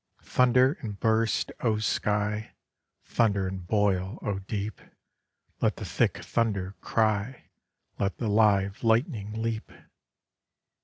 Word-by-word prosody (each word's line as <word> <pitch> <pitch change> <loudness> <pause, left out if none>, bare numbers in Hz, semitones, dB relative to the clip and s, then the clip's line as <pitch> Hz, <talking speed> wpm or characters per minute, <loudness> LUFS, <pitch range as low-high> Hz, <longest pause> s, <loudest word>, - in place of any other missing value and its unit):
Thunder 125 +4 +3
and 105 -6 -6
burst, 110 -1 +1
O 110 -3 +1
Sky; 105 0 -1 0.5
Thunder 100 -4 +1
and 95 -1 -6
boil, 100 -1 +1
O 100 -2 -1
Deep; 100 +1 -4 0.8
Let - - +2
the - - -7
thick - - +1
thunder 100 -5 0
cry; 110 +2 0 0.5
Let 100 -1 -1
the 115 - -2
live 100 -2 +3
lightning 115 - +1
leap! 115 -1 -3
105 Hz, 110 wpm, -28 LUFS, 100-115 Hz, 0.8 s, Thunder